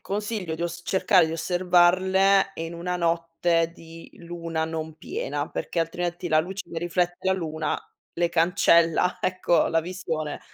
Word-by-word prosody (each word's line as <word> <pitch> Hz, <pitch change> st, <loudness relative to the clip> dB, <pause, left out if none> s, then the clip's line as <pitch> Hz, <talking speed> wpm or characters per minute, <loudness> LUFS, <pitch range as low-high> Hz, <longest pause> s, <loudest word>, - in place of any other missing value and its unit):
consiglio 205 Hz, -4 st, -3 dB
di 165 Hz, -, -5 dB
oss 175 Hz, 0 st, -4 dB
cercare 190 Hz, -2 st, +3 dB
di 160 Hz, -, -4 dB
osservarle 185 Hz, +3 st, +3 dB
in 165 Hz, +1 st, -5 dB
una 180 Hz, +1 st, -3 dB
notte 165 Hz, 0 st, 0 dB
di 165 Hz, 0 st, -13 dB
luna 170 Hz, -2 st, -4 dB
non 160 Hz, -1 st, -5 dB
piena, 465 Hz, -, -4 dB
perché 170 Hz, -, -3 dB
altrimenti 175 Hz, +1 st, -3 dB
la 155 Hz, 0 st, +4 dB
luce 190 Hz, +4 st, -5 dB
che 165 Hz, -, -3 dB
riflette 175 Hz, +1 st, -1 dB
la -, -, +4 dB
luna 160 Hz, -4 st, -2 dB, 0.4 s
le 170 Hz, 0 st, +2 dB
cancella, 170 Hz, 0 st, +3 dB
ecco, 185 Hz, -1 st, +2 dB
la 165 Hz, -, +2 dB
visione. 165 Hz, -3 st, -4 dB
170 Hz, 150 wpm, -25 LUFS, 165-180 Hz, 0.4 s, la